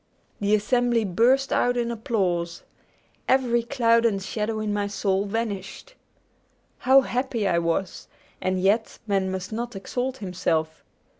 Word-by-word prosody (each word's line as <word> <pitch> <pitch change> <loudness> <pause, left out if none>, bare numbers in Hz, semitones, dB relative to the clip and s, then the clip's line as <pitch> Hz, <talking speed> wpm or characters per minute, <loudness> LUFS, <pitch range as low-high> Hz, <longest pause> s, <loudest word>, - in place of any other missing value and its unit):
The 205 +1 +3
assembly 240 +1 +1
burst 245 +9 +2
out 245 0 +2
in 235 -1 0
applause. 185 -8 -1 0.7
Every 250 -3 +3
cloud 230 -1 +2
and 215 -4 +2
shadow 215 +3 -3
in 215 -1 -2
my 205 -1 -1
soul 200 -1 0
vanished! 215 - -4 0.9
How 265 +1 +6
happy 245 -4 -1
I 170 -2 +2
was! 170 +2 -2 0.3
And 185 0 0
yet 205 +4 +1
man 195 -3 0
must 190 +2 -5
not 240 0 -4
exalt 250 +6 -3
himself. 165 -5 -2
215 Hz, 135 wpm, -25 LUFS, 190-240 Hz, 0.9 s, How